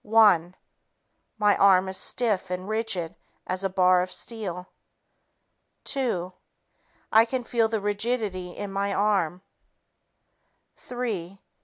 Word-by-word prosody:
One... 205 -6 +4 0.8
My 210 -1 +3
arm 190 -1 +5
is 190 - -4
stiff 210 -6 +1
and 180 +1 -4
rigid 215 -7 -2 0.3
as 185 +1 -2
a 195 - 0
bar 185 -1 +4
of 185 0 -4
steel. 185 -3 -4 1.2
Two... 190 -10 -2 0.8
I 220 +1 +7
can 250 +2 -3
feel 230 -1 +1
the 220 0 -2
rigidity 205 -3 -2
in 205 -1 -5
my 200 0 -1
arm. 195 -4 0 1.3
Three 205 -7 -5
200 Hz, 115 wpm, -26 LUFS, 185-220 Hz, 1.3 s, I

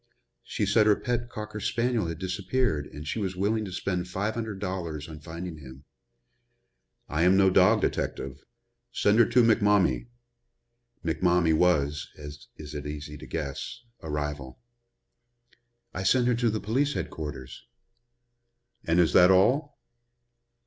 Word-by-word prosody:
"She - - -2
said 105 +2 +3
her 105 - +6
pet 120 +1 -3
cocker 105 -1 -6
spaniel 115 -1 0
had 85 -1 -4
disappeared 95 - -1
and 75 +1 -10
she 110 - -2
was 95 -3 -2
willing 105 +3 0
to 95 - -7
spend 90 -1 -2
five 100 +4 -2
hundred 110 -3 -4
dollars 90 -6 -4
on 80 -2 -9
finding 85 +2 -7
him." 65 0 -12 1.2
"I 75 +2 -1
am 90 +2 +5
no 95 -1 +5
dog 95 +4 +5
detective. 70 0 -3 0.5
Send 105 -1 +2
her 120 - +7
to 120 +1 +4
McMommie." 105 - +3 1.0
McMommie 85 0 +2
was, 75 -4 +1
as 75 -1 -10
it - - -9 0.2
is - - -16
easy 75 0 -6
to - - -10
guess, 75 - -5 0.2
a 80 - -9
rival. 75 -3 -4 1.4
"I 95 - -4
sent 125 +5 +3
her 125 - +3
to 115 -2 0
police 135 +8 0
headquarters." 75 -5 -6 1.2
"And 85 +1 +2
is 85 -2 +3
that 90 0 +7
all?" 125 +11 +3
90 Hz, 140 wpm, -27 LUFS, 75-110 Hz, 1.4 s, her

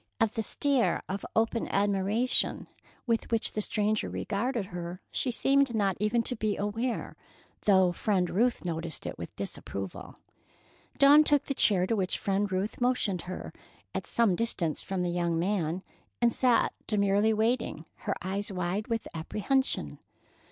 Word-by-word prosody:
Of 225 -1 +2
the 225 - -1
stare 270 +3 +1
of 195 +1 -4
open 225 +1 +1
admiration 205 +4 +1 0.4
with 230 -3 0
which 225 -1 +1
the 215 - -1
stranger 210 0 0
regarded 225 +1 -2
her, 175 0 -6
she 260 - 0
seemed 270 0 +3
not 200 -3 +2
even 215 +3 +1
to 250 - 0
be 215 -2 -1
aware, 225 +4 -2 0.5
though 190 -3 +5
Friend 185 0 +1
Ruth 230 +4 +1
noticed 165 -1 -4
it - - -5
with - - -7
disapproval. 95 -1 -5 0.8
Dawn 285 +2 +8
took 290 -2 +3
the 275 - -1
chair 195 -8 +3
to 225 - 0
which 190 -3 -1
Friend 200 0 0
Ruth 190 +5 -2
motioned 235 -7 +1
her, 185 - -6 0.4
at - - -4
some 225 -6 +2
distance 175 -8 -1
from 190 -2 -2
the 175 - 0
young 170 -1 0
man, 180 -1 -1 0.4
and 235 -1 +3
sat 250 -3 +3
demurely 205 +1 +3
waiting, 220 -6 0
her - - -3
eyes 200 +2 -2
wide 185 +3 -2
with 230 -1 -2
apprehension. 215 - -1
205 Hz, 150 wpm, -29 LUFS, 185-230 Hz, 0.8 s, Dawn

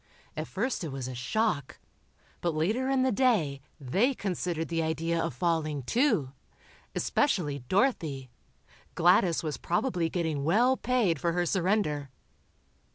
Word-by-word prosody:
At 155 +1 -4
first 225 +1 -2
it 160 - -4
was 135 -2 -4
a 130 - -5
shock, 140 - -1 0.6
but 170 -3 -1
later 215 +12 0
in 265 -1 +2
the 260 - +2
day 195 - +2 0.2
they 195 - +1
considered 175 -5 -2
the 165 -1 0
idea 165 +1 -1
of - - -1
falling, 155 -2 0
too. 215 - +1 0.6
Especially 165 - 0
Dorothy. 160 - 0 0.6
Gladys 175 0 +4
was 155 -2 -3
probably 175 -3 0
getting 160 -5 -1
well 235 - +4
paid 230 - +1
for 170 -1 +1
her 175 0 +1
surrender. 175 -6 0
170 Hz, 135 wpm, -29 LUFS, 150-215 Hz, 0.6 s, Gladys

